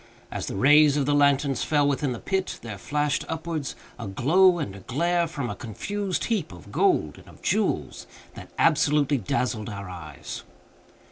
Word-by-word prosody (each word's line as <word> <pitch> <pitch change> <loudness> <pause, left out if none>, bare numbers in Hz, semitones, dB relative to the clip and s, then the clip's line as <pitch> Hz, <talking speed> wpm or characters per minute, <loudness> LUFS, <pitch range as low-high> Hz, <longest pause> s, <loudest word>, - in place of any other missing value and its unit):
As - - -4
the - - -4
rays 145 +6 +6
of 140 - +1
the 145 - +2
lanterns 140 -2 +3
fell 145 -2 +2
within 140 -1 0
the 120 - -3
pit, 190 - -2
there 105 -4 -7
flashed 145 +5 0
upwards 160 -3 -3 0.2
a 115 - -5
glow 175 - +4
and 100 - -4
a - - -9
glare, 170 - 0
from 145 -5 -4
a - - -4
confused 195 - -3
heap 210 - -1
of 90 -4 -12
gold 75 -1 +1
and - - -18
of - - -17
jewels, - - -1 0.3
that - - -11
absolutely 145 -1 +3
dazzled 110 +2 -1
our 100 -3 -7
eyes. 80 -6 -8
145 Hz, 175 wpm, -25 LUFS, 110-160 Hz, 0.3 s, rays